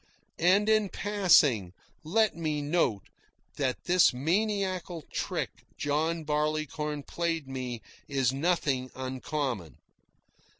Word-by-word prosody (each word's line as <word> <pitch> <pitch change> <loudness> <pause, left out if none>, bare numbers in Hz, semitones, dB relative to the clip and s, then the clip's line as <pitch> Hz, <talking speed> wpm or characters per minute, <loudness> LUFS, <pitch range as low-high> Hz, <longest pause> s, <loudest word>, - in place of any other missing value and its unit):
And, 190 +5 +4
in 215 -2 +3
passing, 155 - +3 0.3
let 215 +7 +2
me 155 -3 -1
note 145 - +1 0.5
that 130 -3 -1
this 180 0 +5
maniacal 185 - -1
trick - - -2 0.3
John 160 +3 0
Barleycorn 150 0 -1
played 165 -3 -2
me 125 -3 -5 0.2
is 135 -3 +1
nothing 140 -4 0
uncommon. 130 - -3
155 Hz, 95 wpm, -29 LUFS, 135-175 Hz, 0.5 s, this